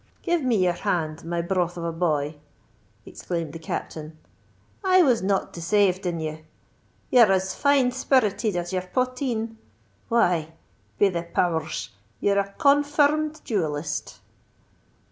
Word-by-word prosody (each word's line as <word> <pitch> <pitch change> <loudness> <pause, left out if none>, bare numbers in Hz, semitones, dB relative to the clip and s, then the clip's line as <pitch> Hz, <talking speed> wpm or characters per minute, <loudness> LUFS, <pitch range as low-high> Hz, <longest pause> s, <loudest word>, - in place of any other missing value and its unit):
"Give 345 -2 +1
me 255 -4 +1
your 180 -3 +2
hand, 160 -2 -2
my 170 +1 -2
broth 175 -1 -1
of 170 - -5
a 170 - -1
boy!" 155 -3 -1 0.7
exclaimed 165 -4 -5
the 165 - -7
Captain: 155 0 -6 0.7
"I 370 -1 +5
was 250 -7 +3
not 195 +1 0
desayved 185 +1 +1
in 170 -1 -2
you! 155 0 -4 0.7
You're 235 -5 +7
as 190 0 +1
fine 280 -3 +3
spirited 220 -6 +1
as 175 +1 -3
your 185 - 0
potheen. 240 +2 -2 0.5
Why! 175 -9 +2 0.4
be 200 - +4
the 170 -2 -2
power 170 -1 0
rs, - - -5 0.3
you're 200 0 +2
a 200 0 -2
confir 290 +1 +4
rmed 310 +1 -3
duellist." 150 -7 -3
190 Hz, 140 wpm, -25 LUFS, 170-250 Hz, 0.7 s, You're